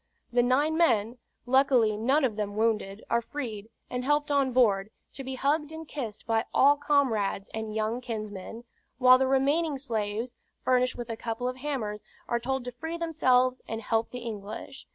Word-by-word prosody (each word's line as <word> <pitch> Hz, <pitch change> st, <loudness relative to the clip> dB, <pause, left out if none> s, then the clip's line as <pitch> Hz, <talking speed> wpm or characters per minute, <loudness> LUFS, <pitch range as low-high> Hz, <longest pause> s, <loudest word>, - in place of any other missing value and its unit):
The 245 Hz, -, +5 dB
nine 285 Hz, +6 st, +2 dB
men 235 Hz, -7 st, +2 dB, 0.3 s
(luckily 250 Hz, -4 st, +4 dB
none 265 Hz, +8 st, +2 dB
of 230 Hz, -5 st, -1 dB
them 205 Hz, -1 st, -3 dB
wounded) 215 Hz, -2 st, 0 dB
are 235 Hz, -, +2 dB
freed, 225 Hz, -6 st, -6 dB, 0.2 s
and 250 Hz, 0 st, -3 dB
helped 295 Hz, +2 st, +1 dB
on 275 Hz, -2 st, +2 dB
board, 210 Hz, -5 st, +3 dB, 0.2 s
to 270 Hz, -, -6 dB
be 265 Hz, 0 st, -5 dB
hugged 295 Hz, +3 st, 0 dB
and 320 Hz, 0 st, -8 dB
kissed 235 Hz, -9 st, -6 dB
by 225 Hz, 0 st, +1 dB
all 285 Hz, +2 st, +6 dB
comrades 260 Hz, -9 st, +1 dB
and 220 Hz, -1 st, -4 dB
young 220 Hz, +3 st, -1 dB
kinsmen; 215 Hz, -2 st, -6 dB, 0.3 s
while 255 Hz, 0 st, +7 dB
the 265 Hz, -, +2 dB
remaining 280 Hz, +3 st, +2 dB
slaves, 230 Hz, -2 st, -3 dB, 0.3 s
furnished 255 Hz, 0 st, +2 dB
with 240 Hz, -1 st, -5 dB
a -, -, -3 dB
couple 230 Hz, +2 st, -3 dB
of 255 Hz, 0 st, -3 dB
hammers, 250 Hz, -7 st, -3 dB, 0.3 s
are 235 Hz, -, 0 dB
told 265 Hz, +1 st, -2 dB
to 250 Hz, -, -4 dB
free 320 Hz, +7 st, -5 dB
themselves 255 Hz, -6 st, +2 dB
and 225 Hz, 0 st, -4 dB
help 225 Hz, +1 st, 0 dB
the 250 Hz, -, -7 dB
English. 220 Hz, +3 st, -7 dB
250 Hz, 175 wpm, -28 LUFS, 220-275 Hz, 0.3 s, while